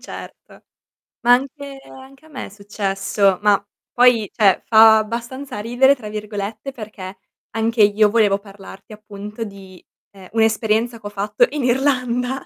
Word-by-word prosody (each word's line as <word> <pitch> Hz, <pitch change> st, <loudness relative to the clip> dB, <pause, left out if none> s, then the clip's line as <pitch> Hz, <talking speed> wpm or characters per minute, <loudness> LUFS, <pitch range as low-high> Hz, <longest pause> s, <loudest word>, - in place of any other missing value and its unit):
Certo. -, -, -12 dB, 0.6 s
Ma 240 Hz, +1 st, +6 dB
anche 275 Hz, +2 st, -2 dB
anche 265 Hz, +3 st, -15 dB
a -, -, -18 dB
me 270 Hz, -4 st, -7 dB
è -, -, -11 dB
successo; 195 Hz, -1 st, -1 dB
ma 205 Hz, -1 st, +3 dB, 0.3 s
poi, 240 Hz, -4 st, +4 dB
cioè 200 Hz, -5 st, +3 dB
fa 220 Hz, -1 st, +7 dB
"abbastanza 240 Hz, +3 st, -6 dB
ridere", 245 Hz, +6 st, +3 dB
tra 220 Hz, -5 st, -9 dB
virgolette, 210 Hz, +3 st, -6 dB
perché 205 Hz, -6 st, -9 dB, 0.3 s
anche 225 Hz, +1 st, 0 dB
io 210 Hz, +1 st, +4 dB
volevo 205 Hz, -2 st, +2 dB
parlarti 195 Hz, 0 st, -14 dB
appunto 210 Hz, +1 st, -8 dB
di, 195 Hz, -3 st, -12 dB, 0.3 s
ehm, 190 Hz, -2 st, -14 dB
un'esperienza 225 Hz, +1 st, +1 dB
ch'ho 205 Hz, -, -8 dB
fatto 205 Hz, +1 st, +1 dB
in 290 Hz, -2 st, -4 dB
Irlanda. 250 Hz, 0 st, 0 dB
220 Hz, 140 wpm, -20 LUFS, 205-245 Hz, 0.6 s, fa